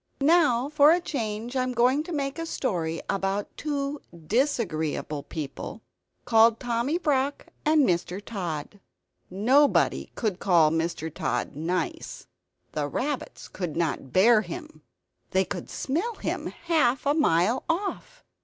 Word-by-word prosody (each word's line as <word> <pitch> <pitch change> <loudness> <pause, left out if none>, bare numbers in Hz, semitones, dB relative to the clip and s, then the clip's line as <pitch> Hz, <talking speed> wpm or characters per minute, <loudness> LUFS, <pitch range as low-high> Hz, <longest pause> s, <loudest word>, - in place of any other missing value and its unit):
Now, 280 -6 +4
for 295 0 +5
a 345 - +4
change, 235 -6 -4
I 260 - +2
am 255 0 -1
going 250 +4 +3
to 355 - -7
make 280 -1 -2
a 330 - -3
story 165 - -2
about 195 +1 -2
two 285 -1 -3 0.2
disagreeable 165 - -1
people, 150 -1 -7 0.4
called 225 0 +5
Tommy 245 +5 0
Brock 285 -4 0 0.2
and 305 -2 +5
Mr. 180 +1 0
Tod. 190 -4 -5 0.5
Nobody 255 +10 +3
could 210 -5 -2
call 170 -5 +4
Mr. 165 -1 -2
Tod 125 +2 -2
"nice." 170 +5 -3 0.5
The 150 -1 -2
rabbits 275 - -4
could 175 -5 -5
not 155 -5 -1
bear 215 +4 +5
him; 315 +5 -8 0.5
they 190 0 +2
could - - -6
smell 365 - -2
him - - -3
half 300 -7 +1
a 285 - +3
mile 225 - +2
off. 405 +8 -3
235 Hz, 135 wpm, -26 LUFS, 180-290 Hz, 0.5 s, for